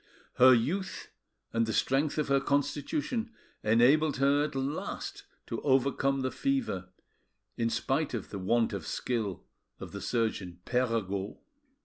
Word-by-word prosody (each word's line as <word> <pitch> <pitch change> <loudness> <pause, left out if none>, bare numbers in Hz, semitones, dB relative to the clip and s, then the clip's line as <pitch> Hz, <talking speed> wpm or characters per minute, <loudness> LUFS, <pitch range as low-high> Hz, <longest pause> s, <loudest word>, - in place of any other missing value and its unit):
Her 130 +1 +8
youth 170 +12 -2 0.4
and 115 -1 +2
the 110 - -1
strength 140 +7 +1
of 150 - 0
her 140 0 +3
constitution 145 - -1 0.3
enabled 130 +7 +4
her 140 +2 +3
at 150 - -6
last 135 +3 -4 0.2
to 115 - -4
overcome 135 0 +2
the 130 0 -1
fever, 255 - -1 0.7
in 115 0 0
spite 135 +5 0
of 115 - -6
the 100 - -4
want 115 +4 +1
of 95 -5 -5
skill 110 -7 -2 0.4
of - - -8
the 100 - -6
surgeon 105 -7 -1
Perregaud. 110 -6 -1
130 Hz, 135 wpm, -30 LUFS, 110-145 Hz, 0.7 s, Her